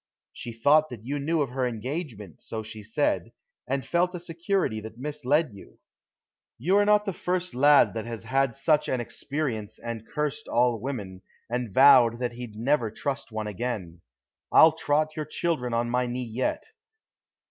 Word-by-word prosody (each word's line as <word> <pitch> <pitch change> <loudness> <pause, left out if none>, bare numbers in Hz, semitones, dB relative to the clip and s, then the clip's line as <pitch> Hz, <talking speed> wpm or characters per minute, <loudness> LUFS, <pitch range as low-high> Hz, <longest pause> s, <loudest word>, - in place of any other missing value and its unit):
She 120 - -7
thought 145 +7 +3
that 115 -3 -9
you 145 +3 -2
knew 155 +2 +1
of 135 - -6
her 130 0 0
engagement, 120 - -6
so 110 -1 -5
she 110 0 -8
said, 110 +8 -1 0.4
and 135 -1 -2
felt 180 +4 +1
a - - -4
security 170 - -1
that 110 +1 -10
misled 150 +1 0
you. 100 - -14 0.8
You 175 - +2
are 205 - +4
not 210 0 +4
the 195 - -2
first 180 +1 -2
lad 145 +3 +5
that 110 0 -4
has 115 -2 -6
had 135 -2 +1
such 150 +2 +2
an 130 - 0
experience 120 -4 -4
and 115 -1 -6
cursed 150 0 -3
all 120 -1 +2
women, 105 -8 -5 0.3
and 120 -3 -2
vowed 120 -1 +7
that 125 0 -2
he'd 120 -2 -8
never 120 +1 +1
trust 135 +4 -4
one 110 -1 -3
again. 105 -5 -4 0.5
I'll 160 - +8
trot 155 0 0
your 155 - -3
children 155 -5 -2
on 115 +1 0
my 125 0 +1
knee 125 +1 -3
yet. 120 +3 -2
125 Hz, 170 wpm, -26 LUFS, 115-150 Hz, 0.8 s, I'll